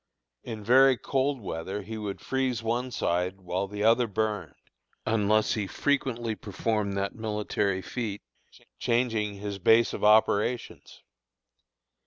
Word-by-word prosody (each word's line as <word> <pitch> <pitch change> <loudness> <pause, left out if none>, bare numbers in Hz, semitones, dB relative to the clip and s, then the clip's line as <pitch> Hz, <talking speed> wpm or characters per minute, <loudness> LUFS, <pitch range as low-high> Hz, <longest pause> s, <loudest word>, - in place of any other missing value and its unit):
In 110 -3 -6
very 130 +3 +6
cold 135 0 -1
weather 95 +2 -4
he 110 +3 -7
would 105 -2 -5
freeze 130 -3 -1
one 120 +3 -1
side 90 -4 -1
while 95 +1 -2
the 105 +1 -4
other 115 +2 +4
burned, 105 -7 -2 0.5
unless 110 -1 +2
he 105 -3 -2
frequently 120 -2 -1
performed 105 -1 -2
that 100 0 -1
military 105 -3 -1
feat, 105 -1 -4 0.6
changing 115 -4 0
"his 100 0 -5
base 115 +5 +4
of - - -5
operations." 110 +2 +2
110 Hz, 125 wpm, -28 LUFS, 100-115 Hz, 0.6 s, very